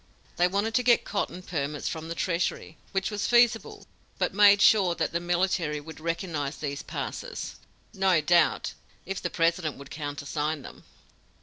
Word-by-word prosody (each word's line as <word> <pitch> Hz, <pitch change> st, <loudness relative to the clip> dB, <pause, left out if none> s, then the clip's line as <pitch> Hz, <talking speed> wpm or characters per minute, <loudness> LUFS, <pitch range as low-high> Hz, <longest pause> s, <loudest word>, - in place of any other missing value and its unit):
They 175 Hz, -, +4 dB
wanted 200 Hz, +4 st, -1 dB
to 250 Hz, -, +3 dB
get 245 Hz, -1 st, +4 dB
cotton 190 Hz, -3 st, -3 dB
permits 150 Hz, -4 st, -3 dB
from 160 Hz, -1 st, -4 dB
the 165 Hz, -, -4 dB
treasury, 170 Hz, -2 st, -2 dB, 0.2 s
which 195 Hz, +2 st, -1 dB
was 210 Hz, +1 st, -2 dB
feasible, 240 Hz, -1 st, +3 dB, 0.3 s
but -, -, 0 dB
made 205 Hz, 0 st, +7 dB
sure 195 Hz, -4 st, +5 dB
that -, -, -1 dB
the 170 Hz, -, 0 dB
military 175 Hz, -3 st, 0 dB
would 160 Hz, +2 st, -11 dB
recognize 165 Hz, -3 st, -3 dB
these 140 Hz, -2 st, -4 dB
passes -, -, -5 dB, 0.4 s
no 190 Hz, -4 st, +3 dB
doubt, 170 Hz, +3 st, +2 dB, 0.3 s
if 195 Hz, -, -4 dB
the -, -, -2 dB
President 165 Hz, -2 st, 0 dB
would 140 Hz, 0 st, -12 dB
countersign 145 Hz, 0 st, -3 dB
them. -, -, -12 dB
175 Hz, 160 wpm, -27 LUFS, 155-195 Hz, 0.4 s, made